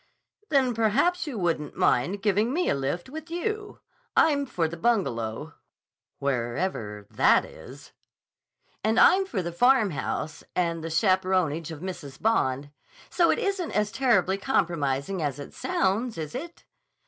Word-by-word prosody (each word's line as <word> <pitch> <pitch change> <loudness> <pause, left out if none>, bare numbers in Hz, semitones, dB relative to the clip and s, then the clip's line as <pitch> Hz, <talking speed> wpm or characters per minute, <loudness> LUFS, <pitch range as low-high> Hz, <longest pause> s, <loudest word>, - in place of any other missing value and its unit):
"Then 265 -4 +3
perhaps 270 - +1
you 265 -6 -4
wouldn't 165 -6 -2
mind 185 +11 +1
giving 210 +3 +2
me 355 +5 +1
a - - +3
lift 140 +6 -2
with 315 +4 -8
you. 420 +5 -4 0.4
I'm 285 -3 +4
for 170 -9 0
the 165 - -6
Bungalow, 155 - -1 0.6
wherever 120 - -2
that - - +4
is." - - -13 0.9
"And 220 +2 +2
I'm 385 +1 +6
for 195 - -2
the 170 - -4
Farmhouse, 185 - +1
and 170 -2 0
the 165 - -4
chaperonage 185 -3 +1
of 160 -2 -8
Mrs. 155 -7 -7
Bond. 145 - 0 0.4
So 345 -2 +3
it - - +3
isn't 395 -6 -2
as 210 0 +1
terribly 200 -7 +2
compromising 170 - 0
as 145 -3 -2
it 145 - -9
sounds, 215 +4 -1
is 155 -2 -5
it? 335 +7 -7
190 Hz, 140 wpm, -26 LUFS, -, 0.9 s, I'm